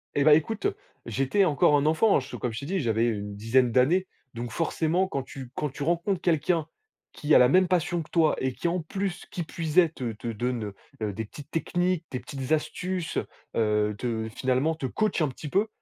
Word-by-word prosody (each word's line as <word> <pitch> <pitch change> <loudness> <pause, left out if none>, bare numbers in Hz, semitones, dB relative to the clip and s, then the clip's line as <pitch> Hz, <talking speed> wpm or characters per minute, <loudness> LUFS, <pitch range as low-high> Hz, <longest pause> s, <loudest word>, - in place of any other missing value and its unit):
Eh 140 - +3
bah 155 - +7
écoute, 210 +7 0 0.4
j'étais 135 - +2
encore 150 -1 +4
un 145 0 +2
enfant, 195 +7 +4
hein, - - +2
je 130 - -8
comme 125 - -2
je 115 - -4
t'ai 140 - -7
dit, 190 +1 0
j'avais, 115 -4 +1
heu, 115 - +1
une 100 0 -6
dizaine 120 +3 +2
d'années, 160 +10 +3 0.3
donc 120 -1 -5
forcément 165 +4 0
quand 140 -7 -3
tu 130 -2 -9
quand 150 - -1
tu 140 - -10
rencontres 170 +4 0
quelqu'un 165 -1 +1 0.5
qui 150 +1 0
a - - +9
la 125 - +7
même 185 0 +5
passion 175 -1 +1
que - - -20
toi 160 -3 +3
et 130 -1 -1
qui 175 - -2
en 175 0 0
plus, 190 +2 -4
qui 175 - -3
puisait 165 +1 +2
te 125 -6 -4
te 110 +3 -8
donne, 115 -2 -2 0.3
heu, 105 -2 -1
des 110 +3 -4
petites 145 +7 -12
techniques, 175 +1 0
des 125 - -2
petites 135 +1 -6
astuces, 180 +3 -1 0.4
heu, 105 -1 +1
te 110 -1 -2
finalement 130 +5 +1
te 150 -4 -5
coach 215 - 0
un 150 - +1
petit 145 +3 -8
peu, 200 +6 +2
150 Hz, 215 wpm, -27 LUFS, 125-175 Hz, 0.5 s, a